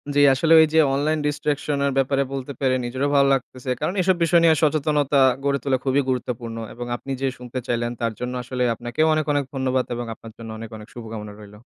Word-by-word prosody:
জী, - - +4
আসলে 160 +5 +3
ওই 160 - +8
যে 160 - +5
online 150 +3 +1
distraction 145 0 -1
এর 140 - +1
ব্যাপারে 135 +1 +2
বলতে 135 0 -4
পেরে 130 -1 +2
নিজেরও 130 +4 -1
ভালো 140 0 +5
লাগতেছে। 130 -1 -4
কারণ 155 +4 -1
এসব 185 +1 +3
বিষয় 170 +1 +4
নিয়ে 160 -1 +6
সচেতনতা 150 -2 +2 0.2
গড়ে 140 0 +1
তোলা 135 -2 +1
খুবই 135 +1 +3
গুরুত্বপূর্ণ 120 -2 -3 0.2
এবং 120 +1 -6
আপনি 135 +2 -8
যে 135 - +1
শুনতে 125 +1 -6
চাইলেন 120 0 -1
তার 115 -1 0
জন্য 125 0 -3
আসলে 125 0 -2
আপনাকেও 120 +7 0
অনেক, 155 -1 0
অনেক 145 0 +1
ধন্যবাদ 130 -1 0
এবং 120 0 -4
আপনার 115 0 -12
জন্য 115 -1 -9
অনেক, 115 0 -8
অনেক 105 0 -12
শুভকামনা 110 -3 -7
রইলো। 105 0 -13
130 Hz, 210 wpm, -23 LUFS, 120-145 Hz, 0.2 s, ওই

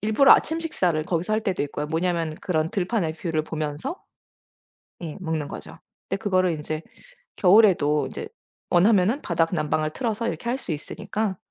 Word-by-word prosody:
일부러 220 +6 +6
아침 320 +1 +2
식사를 180 - 0
거기서 175 +5 -1
할 220 - 0
때도 190 -7 -1
있고요. 145 +1 -4
뭐냐면 165 0 -1
그런 160 -3 -1
들판에 185 -4 -1
뷰를 160 -1 -2
보면서 155 - -4 1.0
예 160 -3 -5
먹는 160 -4 -2
거죠. - - -9 0.3
근데 195 - -1
그거를 185 -4 +2
인제 155 0 -4 0.6
겨울에도 180 -7 +5
이제 445 - -6 0.4
원하면은 200 +7 +4
바닥 165 -2 +1
난방을 155 -1 0
틀어서 230 -2 -2
이렇게 235 - -4
할 245 - 0
수 185 - -6
있으니까 190 +6 -3
175 Hz, 360 characters per minute, -24 LUFS, 155-215 Hz, 1.0 s, 일부러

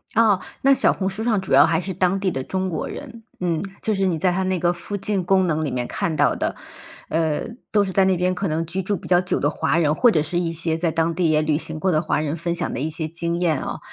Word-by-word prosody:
哦， 215 -4 +4 0.2
那 275 +1 +5
小 - - +3
红 190 - -2
书 210 +3 -5
上 225 -4 +2
主 190 - -3
要 140 +2 +8
还 165 -1 +1
是 190 +2 -4
当 185 +1 +1
地 190 -1 0
的 135 - -3
中 190 +6 -2
国 170 - -3
人， 235 -5 -9 0.2
嗯， 170 -3 -1 0.2
就 220 - +1
是 195 -1 +1
你 170 -3 0
在 180 +3 +2
他 185 +2 -1
那 185 0 0
个 175 +1 +2
附 200 +4 -4
近 200 -1 -1
功 190 +1 +3
能 155 -2 0
里 150 - -1
面 125 -1 -2
看 160 - -2
到 145 - +3
的。 - - -2 0.5
呃， 160 +4 0 0.2
都 205 -1 +4
是 190 - -3
在 190 +1 +3
那 190 -1 +3
边 180 +1 0
可 195 +1 -2
能 160 +1 -1
居 185 +3 -3
住 205 +3 -1
比 - - -9
较 175 -1 +4
久 180 - -1
的 145 - +2
华 160 - 0
人， 155 -2 +2
或 240 +5 +5
者 155 - +2
是 175 +3 -2
一 170 -2 0
些 165 -1 -1
在 165 0 0
当 165 +1 0
地 170 -3 +2
也 155 0 +3
旅 155 -1 +1
行 160 0 -4
过 185 +4 +1
的 155 -1 +1
华 155 - 0
人 155 +2 -2
分 170 +1 -2
享 170 - -3
的 - - -4
一 150 - -1
些 160 0 -4
经 170 +1 -3
验 160 -5 +2
啊。 - - -5
175 Hz, 310 characters per minute, -22 LUFS, 160-190 Hz, 0.5 s, 要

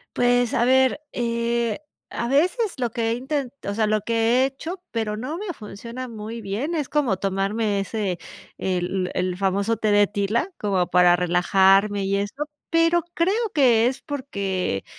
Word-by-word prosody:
Pues 245 -1 +2
a 240 - +2
ver, 260 +2 +4
eh, 235 0 -1 0.3
a 235 - -3
veces 365 - +2
lo 245 -2 -1
que 230 0 -1
he - - +2
inten 265 +2 -2 0.2
o 200 - -2
sea, 215 0 +1
lo 215 0 +1
que 230 +3 +2
he - - +4
hecho, 325 +7 -6
pero 220 -2 -2
no 255 +9 -4
me 390 -3 -4
funciona 235 +4 -8
muy 225 +1 -7
bien, 220 +12 -3
es 295 -4 -2
como 275 -9 +1
tomarme 200 +2 -1
ese 195 -2 -2 0.4
el 185 0 -1
el 180 0 -1
famoso 200 +3 0
té 215 0 +1
de 205 0 +5
tila 210 - -1
como 190 -4 0
para 180 0 +5
relajarme 195 +3 +3
y 195 +1 0
eso, 270 +10 -3 0.2
pero 330 +1 +3
creo 360 +5 +2 0.2
que 240 -5 +4
es 255 - -3
porque 200 - -3
225 Hz, 170 wpm, -23 LUFS, 200-260 Hz, 0.4 s, de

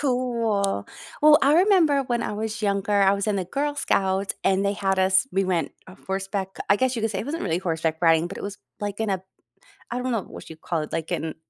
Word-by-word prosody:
cool. 230 - 0 0.3
Well, 300 0 +7
I 280 +2 +5
remember 335 -6 +4
when 240 -1 -1
I - - -3
was 215 0 -4
younger, 200 0 +1
I 195 0 +5
was 200 +1 -1
in 210 - +1
the 190 - -1
Girl 290 +10 -2
Scouts 195 -6 0
and 195 +1 +2
they 200 - +1
had 195 -1 -1
us 190 +6 +3
we 195 +1 +1
went 175 -5 -1 0.3
horseback 195 0 -3
I 200 - +6
guess 260 +1 +1
you 225 - -3
could 225 - +1
say 195 - -3
it - - -5
wasn't 325 +3 -3
really 165 - 0
horseback 160 -3 -1
riding, 165 -1 +4
but - - -8
it - - -7
was 200 0 -5 0.2
like 205 0 -4
in 220 -2 0
a 190 -1 -1 0.7
I 245 +1 -3
don't 255 - -2
know 225 -5 -1
what - - -11
you 160 - -10
call 165 -1 -2
it, 150 - -7
like 160 -1 -3
in 160 -1 -3
200 Hz, 240 wpm, -24 LUFS, 190-240 Hz, 0.7 s, Well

